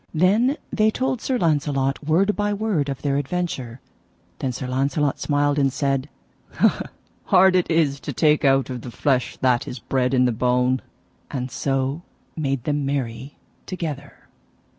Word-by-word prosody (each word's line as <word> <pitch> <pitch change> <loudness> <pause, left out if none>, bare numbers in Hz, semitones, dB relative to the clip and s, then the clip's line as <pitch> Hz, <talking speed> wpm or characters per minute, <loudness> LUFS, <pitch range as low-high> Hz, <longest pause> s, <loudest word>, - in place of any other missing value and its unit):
Then 215 - +3 0.2
they 215 0 +3
told 255 +1 -1
Sir 260 - 0
Launcelot 145 - 0
word 180 +7 +2
by 205 0 0
word 200 -9 0
of 135 -2 -5
their 140 -1 +1
adventure. 140 -5 -3 0.6
Then 130 - -1
Sir 125 +2 -5
Launcelot 135 +2 0
smiled 145 0 +1
and 135 -1 +2
said: 140 0 -1 1.2
Hard 190 0 +5
it 180 - +2
is 155 -4 +2
to 145 - -5
take 150 +3 +2
out 135 -1 +3
of 125 -2 -5
the 125 - -7
flesh 130 +1 0
that 125 -2 +2
is 125 - -5
bred 125 +1 0
in 125 0 +4
the 125 - +2
bone; 125 +2 +1 0.5
and 130 -2 -4
so 135 +2 -1 0.3
made 135 -5 -2
them 145 0 -1
merry 135 -1 -3 0.3
together. 150 -6 -6
140 Hz, 155 wpm, -23 LUFS, 130-165 Hz, 1.2 s, Hard